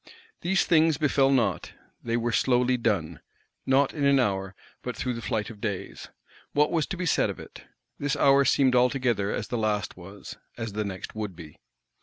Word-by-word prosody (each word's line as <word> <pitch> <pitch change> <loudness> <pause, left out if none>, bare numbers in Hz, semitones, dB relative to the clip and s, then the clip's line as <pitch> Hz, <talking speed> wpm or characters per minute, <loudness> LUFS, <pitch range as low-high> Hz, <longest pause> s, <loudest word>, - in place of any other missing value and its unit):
These 190 +1 +1
things 160 -3 +4
befell 140 -3 +2
not, 120 -7 0 0.3
they 115 0 -1
were 120 0 -1
slowly 125 +1 +2
done; 100 -10 -1 0.5
not 135 +1 +3
in 145 - -3
an 140 -1 +4
hour, 95 -5 -1 0.3
but - - -5
through 125 - -2
the 115 - -6
flight 110 -1 -2
of 105 -2 -14
days: 100 -4 -5 0.4
what 150 +1 +3
was 160 -3 0
to 190 - -5
be 180 - -3
said 165 - +2
of - - -6
it? - - -12 0.3
This 145 -1 -1
hour 140 0 +5
seemed 130 -1 +3
altogether 125 -5 +2
as - - -4
the 120 - -2
last 105 -3 -1
was, 95 +2 -10 0.2
as 115 -2 -5
the 105 +1 -1
next 95 -2 -6
would 105 -4 -5
be. 80 -3 -12
120 Hz, 190 wpm, -26 LUFS, 105-140 Hz, 0.5 s, hour